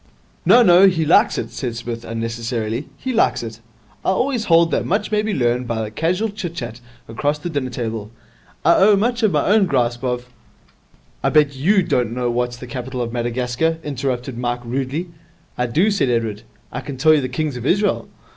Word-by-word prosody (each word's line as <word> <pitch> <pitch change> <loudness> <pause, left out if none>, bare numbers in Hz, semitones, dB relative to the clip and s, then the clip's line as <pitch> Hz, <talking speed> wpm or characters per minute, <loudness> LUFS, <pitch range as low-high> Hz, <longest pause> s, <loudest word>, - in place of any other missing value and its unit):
'No, 245 - +7
no, 185 -1 +7
he 165 -4 +1
likes 160 - +4
it,' - - -4
said 120 -4 -4
Psmith, 115 0 -5
unnecessarily. 115 +1 -3
'He 260 - -3
likes 225 - +2
it. 115 -1 -7 0.4
I - - 0
always 245 +3 0
hold 165 -1 +4
that - - +1
much 210 +4 -1
may 210 0 +2
be 215 0 -2
learned 125 -6 0
by 110 -2 -2
casual 180 - 0
chit 195 -5 -6
chat 120 -4 -6 0.3
across 145 +6 -1
the 170 +4 -5
dinner 140 -4 -2
table. 115 -3 -4 0.6
I 170 - +6
owe 205 +2 +6
much 235 +4 0
of 215 -3 +3
my 150 -3 +1
own 205 -1 +4
grasp 120 -4 0
of 125 -1 -2 0.5
' - - -35
'I - - +3
bet 145 -2 +3
you 190 +9 +3
don't 120 -7 0
know 120 -1 -1
what's 120 0 -1
the 125 - -9
capital 125 +1 -5
of 120 -1 -3
Madagascar,' 125 +6 -1
interrupted 130 -3 -3
Mike 120 0 -2
rudely. 135 +8 -3 0.5
'I 125 - -1
do,' 175 - +2
said 145 -10 +1
Edward. 115 -3 -1 0.3
'I - - -4
can 140 - -7
tell 155 +4 +5
you 150 - +3
the 130 - -3
kings 145 +2 -2
of 125 - -6
Israel?' 205 +5 +1
130 Hz, 200 wpm, -20 LUFS, 120-175 Hz, 0.6 s, No